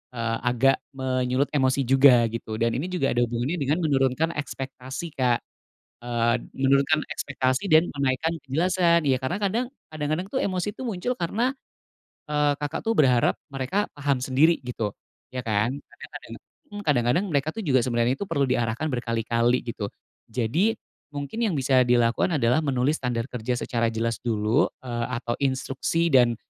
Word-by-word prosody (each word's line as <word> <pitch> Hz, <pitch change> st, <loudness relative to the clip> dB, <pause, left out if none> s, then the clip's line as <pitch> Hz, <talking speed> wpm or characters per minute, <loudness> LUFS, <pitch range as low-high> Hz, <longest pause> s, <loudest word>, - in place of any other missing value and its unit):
eee, 115 Hz, -1 st, -1 dB
agak 125 Hz, +2 st, +3 dB, 0.2 s
menyulut 130 Hz, +1 st, 0 dB
emosi 135 Hz, -1 st, +2 dB
juga 130 Hz, -1 st, +6 dB
gitu 115 Hz, -1 st, -5 dB
dan 115 Hz, +1 st, +1 dB
ini 145 Hz, +9 st, -2 dB
juga 180 Hz, -7 st, 0 dB
ada 120 Hz, -, 0 dB
hubungannya 120 Hz, +9 st, -2 dB
dengan 145 Hz, +4 st, 0 dB
menurunkan 135 Hz, +2 st, +1 dB
ekspektasi 135 Hz, +2 st, -6 dB
Kak, 125 Hz, -2 st, +3 dB, 0.6 s
eee, 120 Hz, 0 st, +1 dB, 0.2 s
menurunkan 140 Hz, +3 st, +3 dB
ekspektasi 135 Hz, +6 st, -1 dB
dan 160 Hz, +3 st, +6 dB
menaikkan 140 Hz, +4 st, 0 dB
kejelasan. 170 Hz, +3 st, +2 dB
Ya 135 Hz, -, +4 dB
karena 175 Hz, +9 st, -1 dB
kadang, 210 Hz, +5 st, 0 dB, 0.2 s
kadang-kadang 155 Hz, +4 st, -3 dB
tuh, 260 Hz, -, -2 dB
emosi 190 Hz, +2 st, -2 dB
tuh 260 Hz, -, -7 dB
muncul 235 Hz, +2 st, -2 dB
karena, 230 Hz, +9 st, -1 dB, 0.7 s
eee, 150 Hz, -1 st, +1 dB
Kakak 145 Hz, +1 st, -3 dB
tuh 225 Hz, -, +1 dB
berharap 125 Hz, -5 st, +4 dB, 0.2 s
mereka 135 Hz, +10 st, -1 dB
paham 145 Hz, -2 st, 0 dB
sendiri 155 Hz, +6 st, +4 dB
gitu, 115 Hz, -4 st, -3 dB, 0.4 s
ya 125 Hz, -1 st, -5 dB
kan? 110 Hz, +4 st, 0 dB
Kadang -, -, -13 dB
karena -, -, -9 dB, 0.4 s
mmm, 205 Hz, -, -6 dB
kadang-kadang 125 Hz, -, +2 dB
mereka 140 Hz, +1 st, +1 dB
tuh -, -, -6 dB
juga 130 Hz, -6 st, +3 dB
sebenernya 120 Hz, +1 st, +1 dB
perlu 165 Hz, -8 st, -1 dB
diarahkan 120 Hz, +4 st, 0 dB
berkali-kali 120 Hz, -1 st, 0 dB
gitu. 105 Hz, -3 st, -4 dB, 0.4 s
Jadi 145 Hz, -, +1 dB, 0.4 s
mungkin 145 Hz, +9 st, -5 dB
yang 215 Hz, -9 st, +1 dB
bisa 130 Hz, -1 st, +3 dB
dilakukan 120 Hz, +7 st, +2 dB
adalah 125 Hz, +3 st, +3 dB
menulis 140 Hz, 0 st, 0 dB
standar 120 Hz, -2 st, -1 dB
kerja 125 Hz, 0 st, -2 dB
secara 115 Hz, -1 st, -1 dB
jelas 115 Hz, +1 st, -2 dB
dulu, 115 Hz, +5 st, +1 dB, 0.2 s
eee, 120 Hz, -1 st, -2 dB
atau 120 Hz, -1 st, -3 dB
instruksi 140 Hz, +5 st, 0 dB
dan, 120 Hz, -3 st, +5 dB
135 Hz, 155 wpm, -25 LUFS, 120-155 Hz, 0.7 s, juga